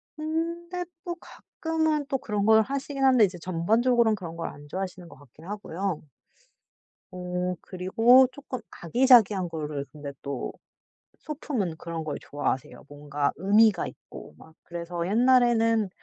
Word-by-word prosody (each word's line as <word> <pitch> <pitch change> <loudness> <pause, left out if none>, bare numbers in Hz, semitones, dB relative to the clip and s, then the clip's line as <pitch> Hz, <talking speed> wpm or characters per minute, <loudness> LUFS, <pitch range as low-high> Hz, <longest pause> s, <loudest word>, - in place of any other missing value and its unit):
근데 335 +3 -3 0.2
또 350 - -3
가끔은 315 -3 -2
또 275 - 0
그런 210 -5 -2
걸 220 0 +6
하시긴 275 +3 -3
하는데 255 -5 +6
이제 180 -2 -5
전반적으로는 220 +7 +2
그런 170 -4 -8
걸 170 - -3
안 145 0 -11
좋아하시는 185 -2 -5
것 145 - -14
같긴 145 +2 -18
하고요. 195 -3 -4 1.1
어 180 0 -3
그리고 225 +8 +4
쪼끔 260 -2 -7 0.2
아기자기한 210 -2 +5
거를 150 -3 -4
근데 145 -2 -7
또 140 -2 -4 0.7
소품은 250 - -3
그런 165 -1 -5
걸 150 -2 -4
좋아하세요. 145 -3 -4
뭔가 145 0 -2
의미가 205 +4 +4
있고. - - -12
막 160 - -17
그래서 170 0 -4
옛날에는 230 -2 +3
200 Hz, 305 characters per minute, -27 LUFS, 165-255 Hz, 1.1 s, 걸